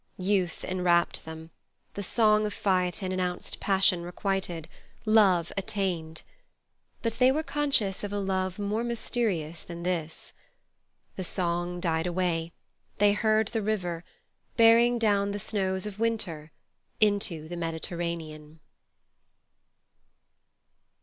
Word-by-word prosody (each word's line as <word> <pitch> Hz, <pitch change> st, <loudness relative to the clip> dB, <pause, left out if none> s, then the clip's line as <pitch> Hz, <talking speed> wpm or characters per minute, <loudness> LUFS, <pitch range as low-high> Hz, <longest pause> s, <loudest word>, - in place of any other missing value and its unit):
Youth 185 Hz, -2 st, 0 dB
enwrapped 180 Hz, -2 st, +1 dB
them; 160 Hz, 0 st, -9 dB, 0.4 s
the 200 Hz, -, -4 dB
song 215 Hz, +1 st, +3 dB
of 210 Hz, -, -6 dB
Phaethon 185 Hz, -1 st, 0 dB
announced 180 Hz, -1 st, -2 dB
passion 190 Hz, -3 st, +3 dB
requited, 175 Hz, -2 st, -3 dB, 0.4 s
love 195 Hz, -6 st, +4 dB
attained. 185 Hz, -5 st, -2 dB, 0.8 s
But 230 Hz, 0 st, -2 dB
they 255 Hz, +1 st, +6 dB
were 310 Hz, +4 st, 0 dB
conscious 275 Hz, -12 st, 0 dB
of 205 Hz, -, -3 dB
a 205 Hz, -, -2 dB
love 190 Hz, -2 st, -1 dB
more 210 Hz, +2 st, -1 dB
mysterious 215 Hz, -9 st, -1 dB
than 170 Hz, 0 st, -8 dB
this. 165 Hz, -3 st, -3 dB, 0.8 s
The 190 Hz, -, -2 dB
song 175 Hz, -1 st, -2 dB
died 165 Hz, -1 st, 0 dB
away; 175 Hz, -2 st, -1 dB, 0.5 s
they 205 Hz, 0 st, +5 dB
heard 215 Hz, 0 st, +2 dB
the 225 Hz, -2 st, -1 dB
river, 180 Hz, -5 st, -2 dB, 0.5 s
bearing 230 Hz, +1 st, +6 dB
down 205 Hz, -3 st, +2 dB
the -, -, -2 dB
snows 190 Hz, -2 st, -1 dB
of 210 Hz, -1 st, -7 dB
winter 180 Hz, -9 st, -2 dB, 0.5 s
into 200 Hz, -7 st, +1 dB
the 175 Hz, -, -6 dB
Mediterranean. 165 Hz, -2 st, -4 dB
190 Hz, 115 wpm, -28 LUFS, 170-210 Hz, 0.8 s, they